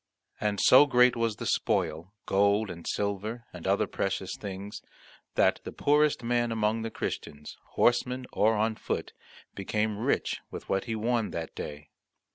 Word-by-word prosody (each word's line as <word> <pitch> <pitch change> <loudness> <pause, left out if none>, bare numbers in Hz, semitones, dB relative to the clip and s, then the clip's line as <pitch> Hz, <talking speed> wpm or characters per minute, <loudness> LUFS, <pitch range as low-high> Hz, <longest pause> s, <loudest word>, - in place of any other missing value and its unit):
And 105 -2 -1
so 135 +8 +7
great 125 -2 +5
was 115 -2 0
the - - -6
spoil, 85 +6 -1
gold, 100 +2 +2
and 85 -1 -9
silver, 105 +4 -2
and 90 -1 -7
other 100 +1 +2
precious 95 -1 -3
things 100 0 -7 0.5
that - - +3
the - - -6
poorest 150 -2 +2
man 120 0 +1
among 110 0 0
the 115 - -3
Christians, 75 -8 -5 0.2
horseman 125 +1 +2
or 110 +2 +3
on 110 +1 +1
foot, - - -4 0.4
became 105 +2 -1
rich 125 +5 0
with - - -8
what 95 0 0
he 115 -2 -2
won 115 0 0
that 80 -1 -5
day. 75 +1 -8
105 Hz, 155 wpm, -28 LUFS, 95-120 Hz, 0.5 s, so